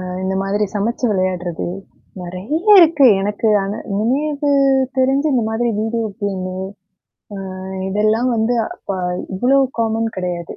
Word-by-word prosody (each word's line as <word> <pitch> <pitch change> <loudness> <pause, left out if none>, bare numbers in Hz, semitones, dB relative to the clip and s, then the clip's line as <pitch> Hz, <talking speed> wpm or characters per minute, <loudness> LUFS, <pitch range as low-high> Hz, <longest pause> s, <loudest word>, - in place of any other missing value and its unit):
அ - - -6 0.2
இந்த 190 0 -1
மாதிரி 205 +2 0
சமச்சு 230 +4 -1
விளையாடுறது, 185 -3 -2 0.6
நறைய 185 - -3 0.2
இருக்கு. 305 -5 +5
எனக்கு 210 +2 -1 0.2
ஆனா 200 +2 -4
இனிமேது 285 +7 0 0.5
தெரிஞ்சு, 270 +3 +2
இந்த 235 -3 +1
மாதிரி 235 +2 0
வீடியோ 225 0 -1 0.2
கேம்மு 185 -2 -3 0.8
அ 195 - -6 0.5
இதெல்லாம் 215 +5 +1
வந்து 230 +2 +1
அப்ப - - -13 0.5
இவ்வளோ 260 +8 +3 0.2
காமன் 225 0 0
கெடையாது. 175 -2 -4
220 Hz, 125 wpm, -18 LUFS, 190-245 Hz, 0.8 s, இருக்கு